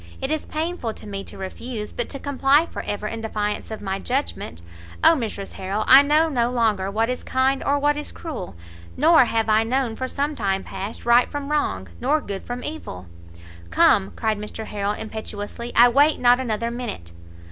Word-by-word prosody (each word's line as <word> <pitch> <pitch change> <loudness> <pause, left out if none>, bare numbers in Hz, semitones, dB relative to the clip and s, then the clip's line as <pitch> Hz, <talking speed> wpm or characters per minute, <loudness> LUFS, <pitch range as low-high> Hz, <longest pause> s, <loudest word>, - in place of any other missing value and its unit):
it 265 - -3
is 310 -1 -2
painful 315 -7 -3
to - - -12
me 200 -1 -5
to - - -12
refuse, 210 +3 -6
but 240 - -3
to 275 - -5
comply 285 +2 +3
for - - -6
ever 205 +1 -4
in 225 +1 -4
defiance 210 -2 -3
of 220 -1 -7
my 195 0 -2
judgment 245 - -3 0.4
Oh - - +8
Mrs 220 -8 -4
Harrel, 195 +3 -2
I 265 +2 +9
know 300 +3 +3
no 245 -6 +1
longer 220 -6 +1
what 220 +3 +1
is 250 +1 -3
kind 265 +1 +1
or 285 +1 +2
what 290 +1 +2
is 295 0 -5
cruel, 260 - -7 0.4
nor 320 -1 +6
have 225 -1 0
I 220 0 +4
known 245 0 -1
for 260 - -3
some 290 +3 -2
time 195 -4 -1
past 195 +3 -7
right 240 +1 +5
from 290 0 -5
wrong, 95 - -1
nor 310 - +2
good 200 -8 -7
from 245 +1 -5
evil!" 295 - -6 0.6
"Come," 95 +3 +4
cried 215 -2 -1
Mr 210 +1 -6
Harrel 205 -1 -2
impetuously, 220 +1 -6
"I 240 +1 +8
wait 285 +5 +4
not 245 0 +5
another 235 -2 -2
minute!" 235 - -6
235 Hz, 190 wpm, -23 LUFS, 210-275 Hz, 0.6 s, I